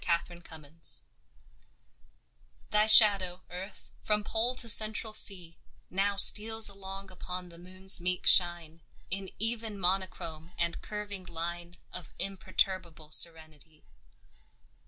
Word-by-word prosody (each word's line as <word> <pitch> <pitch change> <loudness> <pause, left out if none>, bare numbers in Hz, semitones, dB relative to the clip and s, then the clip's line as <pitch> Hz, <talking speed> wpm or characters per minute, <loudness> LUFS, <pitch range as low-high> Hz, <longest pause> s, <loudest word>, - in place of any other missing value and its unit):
AT 170 +1 -3
A - - -12
LUNAR 175 - -16
ECLIPSE 160 - +1 1.7
THY 210 +1 +1
shadow, 195 -5 +5
Earth, 190 +3 -12
from 210 -1 -1
Pole 230 +4 -3
to 245 -2 -6
Central 215 0 +2
Sea, 175 -6 +1 0.3
Now 200 +2 -3
steals 220 +2 +5
along 195 -1 -9
upon 180 0 -10
the 170 0 -15
Moon's 185 +1 -2
meek 180 +1 -4
shine 170 -2 +3 0.3
In 195 0 -6
even 225 -1 -5
monochrome 175 -3 -6
and 170 0 -5
curving 205 -3 -9
line 170 +1 -9 0.2
Of 180 - -13
imperturbable 185 -5 -5
serenity. 155 -2 +1
185 Hz, 115 wpm, -27 LUFS, 170-205 Hz, 1.7 s, shadow